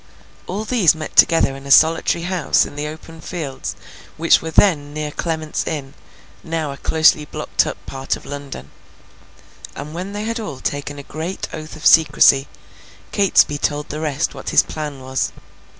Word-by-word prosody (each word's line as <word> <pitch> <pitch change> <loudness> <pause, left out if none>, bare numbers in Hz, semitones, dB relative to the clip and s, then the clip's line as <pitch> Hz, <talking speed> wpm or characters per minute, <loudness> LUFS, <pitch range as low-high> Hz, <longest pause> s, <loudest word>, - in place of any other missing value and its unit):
All 205 +4 -4
these 210 - +3
met 155 -1 -7
together 165 -5 +5
in 135 0 -10
a - - -7
solitary 160 +3 +4
house 180 -2 +1
in - - -10
the 145 +1 -3
open 160 +1 -10
fields 150 -6 -5 0.4
which 165 +1 +4
were 160 - -5
then 150 -4 +2
near 150 -1 -3
Clement's 160 -1 -3
Inn, 145 -4 -4 0.5
now 160 -3 -3
a 140 - -8
closely 155 -1 +3
blocked - - -1
up - - -4
part 135 0 -3
of - - -13
London; 140 - -8 1.0
and 150 +2 -7
when 185 +4 -5
they 205 +1 -4
had 230 +2 -3
all 150 -12 -6
taken 145 +1 -4
a 140 - -8
great 160 +6 -5
oath 155 0 -7
of 155 - -11
secrecy, 145 -4 +6 0.6
Catesby 190 -7 +3
told 145 0 -2
the 150 - -5
rest 150 -1 -1
what - - -6
his - - +5
plan 150 -3 -6
was. 130 0 -2
155 Hz, 170 wpm, -20 LUFS, 145-165 Hz, 1.0 s, secrecy